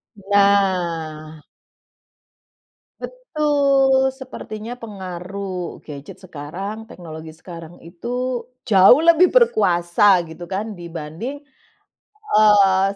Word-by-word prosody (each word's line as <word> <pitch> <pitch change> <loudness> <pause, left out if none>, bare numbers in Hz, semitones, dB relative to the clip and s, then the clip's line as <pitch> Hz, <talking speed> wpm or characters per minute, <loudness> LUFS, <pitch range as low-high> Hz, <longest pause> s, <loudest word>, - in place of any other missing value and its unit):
Nah. 180 -6 0 1.6
Betul. 280 - +1
Sepertinya 245 -3 -8
pengaruh 190 -4 -7
gadget 145 -2 -10
sekarang. 185 +6 -7
Teknologi 160 -2 -10
sekarang 165 +1 -12
itu, 240 +8 -4 0.2
jauh 200 +4 +7
lebih 335 +2 +5
berkuasa, 180 - +2 0.2
gitu 160 +2 -10
kan, 210 +2 -4
dibanding, 170 - -7 1.0
eee, 200 -3 +5
195 Hz, 75 wpm, -20 LUFS, 170-245 Hz, 1.6 s, jauh